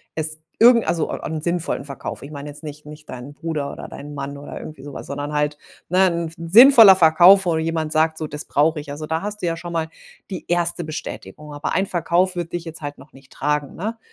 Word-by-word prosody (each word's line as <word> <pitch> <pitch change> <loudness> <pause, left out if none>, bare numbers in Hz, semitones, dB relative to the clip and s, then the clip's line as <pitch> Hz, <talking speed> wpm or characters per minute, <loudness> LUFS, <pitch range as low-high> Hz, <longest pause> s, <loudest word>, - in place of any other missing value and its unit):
es 155 0 -2 0.2
irgend 235 -1 +6
also, 165 -2 0
einen 160 0 -4
sinnvollen 170 -3 -2
Verkauf. 140 -3 -7
Ich 140 - -10
meine 145 0 -7
jetzt 145 +2 -10
nicht 150 0 -9
nicht 150 0 -12
deinen 130 +3 -8
Bruder 150 -3 -4
oder - - -9
deinen 145 +1 -9
Mann 140 0 -5
oder 145 - -8
irgendwie 150 -3 -10
so 145 +1 -9
was. - - -8
Sondern 145 +1 -5
halt, 150 0 -1 0.3
ne, 185 +2 +4
'n 170 -2 -2 0.2
sinnvoller 225 -2 +9
Verkauf, 180 +3 +6
wo 170 - +1
jemand 160 -1 -2
sagt: 160 0 +2
„So, 155 - -4
das 150 +1 -4
brauche 155 +2 +1
ich.“, 145 - -9
also, 150 +2 -6
da 160 +1 -2
hast 210 +1 -5
du - - -2
ja 165 - 0
schon 170 +1 -8
mal 165 -1 -1 0.4
die 185 -3 -6
1. 175 0 +1
Bestätigung. 150 -1 -8
Aber 145 +1 -4
ein 190 - +1
Verkauf 180 +1 0
wird 170 -1 -4
dich 175 -1 -4
jetzt 165 -1 -8
halt 145 -1 -6
noch 145 - -17
nicht 135 0 -18
tragen, 150 -1 -2
ne? 220 +6 -4
160 Hz, 230 wpm, -21 LUFS, 150-175 Hz, 0.4 s, sinnvoller